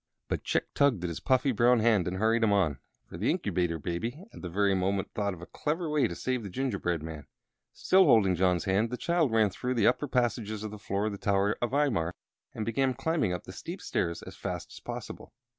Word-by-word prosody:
But - - -2
Chick - - -1
tugged 130 -11 +2
at 90 - -1
his 85 - -5
puffy 130 +1 +2
brown 120 +1 +4
hand 110 -5 +3
and 90 +1 -2
hurried 115 +3 +2
him 110 - +4
on, 85 -10 +2 0.3
for - - -10
the - - +1
Incubator 85 -2 0
Baby 115 - -4
at - - -11
that 90 - -5
very 100 +3 +2
moment 95 +1 0
thought 100 -2 -1
of 85 - -11
a - - -6
clever 155 - -2
way 150 -2 +3
to - - -6
save 130 -1 -2
the 100 - -6
gingerbread 95 - -2
man. 80 -2 -7 0.4
Still 190 0 +4
holding 110 - +5
John's 90 -1 +1
hand, 100 +4 +2
the 125 - -4
child 170 -5 +1
ran 110 -3 +3
through 125 +7 -3
the 110 -3 +2
upper 145 - +2
passages 115 -4 -1
to 110 - -4
the 105 0 -9
foot 100 +1 -2
of 110 - -1
the 100 - -7
tower 100 +1 +2
of 120 - +1
Imar, 120 - +1 0.4
and 110 - -4
began 130 +3 +1
climbing 135 - 0
up 90 -2 -3
the - - -10
steep - - -7
stairs 85 0 -2
as - - -10
fast - - -5
as - - -10
possible. - - -8
105 Hz, 230 wpm, -29 LUFS, 95-125 Hz, 0.4 s, holding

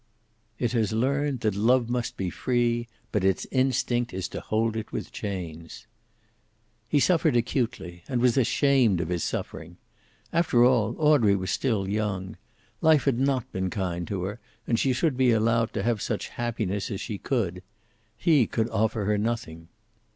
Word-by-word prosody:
It 120 -2 -1
has 110 -3 0
learned 135 +2 0
that 110 -2 +1
love 115 +4 +3
must 120 -1 -2
be 95 -2 -2
free, 120 0 0 0.2
but 105 - 0
its 95 -1 +1
instinct 125 -3 0
is 95 -1 -2
to - - -6
hold 110 +1 0
it 110 -1 -5
with - - -5
chains. 85 -6 -6 1.0
He 145 - +2
suffered 160 -3 +3
acutely, 115 -8 -2
and 125 -3 -1
was 120 -1 +3
ashamed 130 - +3
of 85 -1 -2
his 85 -2 -1
suffering. - - -5 0.6
After 145 -8 +4
all, 120 -3 +2
Audrey 145 -10 +4
was 95 -1 -2
still 110 -4 0
young. 100 -2 -2 0.5
Life 155 -3 +5
had 130 -4 +2
not 130 -2 0
been 95 0 -2
kind 90 -3 -3
to 95 -3 -3
her, 100 +5 -4 0.3
and 115 - +1
she 135 - +2
should 130 +1 0
be 130 -1 +4
allowed 115 0 +2
to - - -2
have 115 -2 0
such - - -3
happiness 110 -5 -3
as 100 -4 -4
she 105 -4 -5
could. 95 -9 -1 0.6
He 150 -8 +3
could 115 0 -1
offer 110 -1 0
her 105 0 +1
nothing. 100 -8 -3
115 Hz, 165 wpm, -26 LUFS, 100-125 Hz, 1.0 s, Life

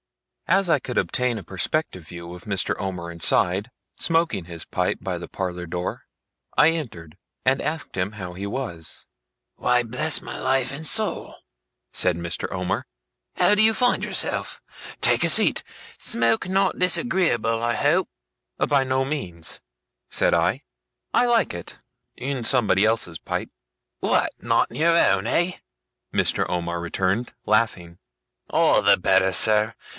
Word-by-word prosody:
As 190 +1 +3
I 150 - +4
could 125 -1 -6
obtain 125 -2 0
a 100 - -7
perspective 95 - -2
view 85 +1 -9
of 90 -1 -11
Mr. 100 -3 -1
Omer 90 -4 -4
inside, 90 +5 +1 0.3
smoking 165 - 0
his 85 -1 -9
pipe - - -1
by - - -3
the - - -8
parlour 90 -2 -4
door, 90 +1 -5 0.5
I 150 - +7
entered, 90 - -6 0.3
and 130 +1 +3
asked 155 +2 -4
him 95 +2 -2
how 90 -4 -7
he 95 +3 -6
was. 100 -8 -6 0.5
'Why, 125 0 +2
bless 130 +7 -1
my - - -8
life 130 0 0
and 155 +3 -6
soul!' 215 +6 0 0.6
said 90 -2 +2
Mr. 85 0 -4
Omer, 90 0 -2 0.5
'how 205 - +4
do 210 - +4
you 220 0 +6
find 245 +2 +2
yourself? - - -1 0.4
Take - - +3
a - - +2
seat. - - +3 0.3
Smoke 225 -4 +3
not 195 +1 +1
disagreeable, 170 - +2
I 120 0 +1
hope?' - - +2 0.5
'By 140 -2 +2
no 130 0 0
means,' 90 - -5 0.5
said - - +2
I. - - +1 0.5
'I 245 - +4
like 235 -1 +2
it 85 -1 -8 0.4
in 130 -1 -3
somebody 110 -6 +3
else's 110 -7 0
pipe.' - - -4 0.5
'What, - - +1
not 115 +1 +1
in - - -8
your 165 +2 +4
own, 95 - +3
eh?' 175 +1 0 0.5
Mr. - - +1
Omer 85 -1 -2
returned, 95 +6 -1
laughing. 90 -6 0 0.5
'All - - +4
the - - +5
better, 95 +1 +3
sir. 105 +3 +2
110 Hz, 150 wpm, -23 LUFS, 90-150 Hz, 0.6 s, I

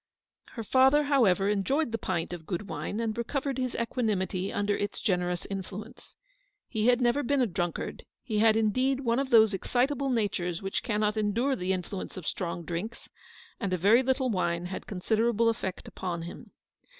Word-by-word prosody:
Her 230 - -5
father, 265 +6 +5
however, 225 -10 +3
enjoyed 225 - +1
the 225 - -2
pint 175 -1 -2
of 165 -2 -8
good 195 +2 -3
wine, 205 - -4
and 225 -2 -1
recovered 265 +3 -2
his 255 -1 -2
equanimity 205 -5 -1
under 205 0 0
its 205 0 -3
generous 180 -3 0
influence. 195 +2 -7 0.5
He 220 -1 0
had 250 0 +4
never 245 +4 +3
been 285 +1 +1
a 255 - +4
drunkard; 175 -4 -3 0.2
he 220 -4 -1
had 220 0 +5
indeed 255 +5 +1
one 235 -1 +1
of 275 -1 -1
those 220 -3 +6
excitable 260 +7 0
natures 190 -8 -1
which 195 0 -2
cannot 210 -2 0
endure 225 +6 +1
the 185 -2 -2
influence 185 +1 -4
of 180 - -7
strong 170 0 -3
drinks, 180 +8 -5 0.5
and 190 -2 -2
a - - +2
very 205 +8 +5
little 260 -1 +1
wine 175 -3 0
had 185 +1 -6
consi 205 +3 -1
derable 230 0 +3
effect 190 -5 -5
upon 175 -3 -4
him. 170 - -9
215 Hz, 175 wpm, -29 LUFS, 185-245 Hz, 0.5 s, those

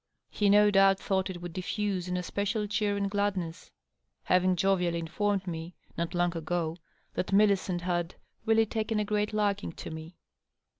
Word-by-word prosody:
He 205 -1 +2
no 205 +1 +6
doubt 195 -1 +5
thought 190 -1 -1
it 175 -2 -7
would 175 -1 -6
diffuse 185 0 -2
an 180 0 -1
especial 205 +4 -1
cheer 205 0 0
and 200 0 0
gladness, 195 -5 -2 0.5
having 185 0 +3
jovially 180 -2 +1
informed 195 +4 -1
me, 165 0 -6 0.2
not 170 +1 -3
long 175 0 +1
ago, 165 0 -2 0.4
that 185 - -2
Millicent 195 -3 +3
had 175 -1 -2
" - - -42
really 225 0 +5
taken 220 0 -1
a 210 - 0
great 210 0 0
liking 205 -3 0
to - - -8
me." 160 +2 -8
190 Hz, 165 wpm, -29 LUFS, 175-205 Hz, 0.5 s, no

